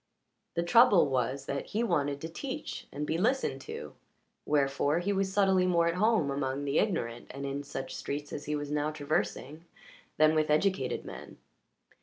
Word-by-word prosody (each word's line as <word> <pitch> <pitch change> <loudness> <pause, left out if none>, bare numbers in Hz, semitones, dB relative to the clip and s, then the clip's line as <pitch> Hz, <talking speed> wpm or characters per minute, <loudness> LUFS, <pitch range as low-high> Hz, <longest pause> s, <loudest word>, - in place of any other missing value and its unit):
The 170 - +1
trouble 205 - +6
was 130 +1 -1
that 140 0 -3
he 220 +3 -1
wanted 145 -9 0
to 160 - -4
teach 270 - -6
and 145 +2 -3
be 160 +2 -1
listened 255 +7 +1
to; 455 +1 -7 0.5
wherefore 145 +1 +2
he 190 +4 0
was 195 0 0
subtly 190 -2 +3
more 170 -2 +3
at 170 - +2
home 205 -6 +2
among 140 0 -2
the 140 +1 +2
ignorant 120 - -1
and 140 +1 -6
in 140 +1 -3
such 140 -1 -6
streets 145 +1 -5
as 145 - -5
he 150 - -1
was 145 0 -4
now 150 0 0
traversing 155 0 -2 0.5
than 155 0 +5
with 155 -1 +1
educated 185 +6 +1
men. - - -9
155 Hz, 175 wpm, -30 LUFS, 140-190 Hz, 0.5 s, trouble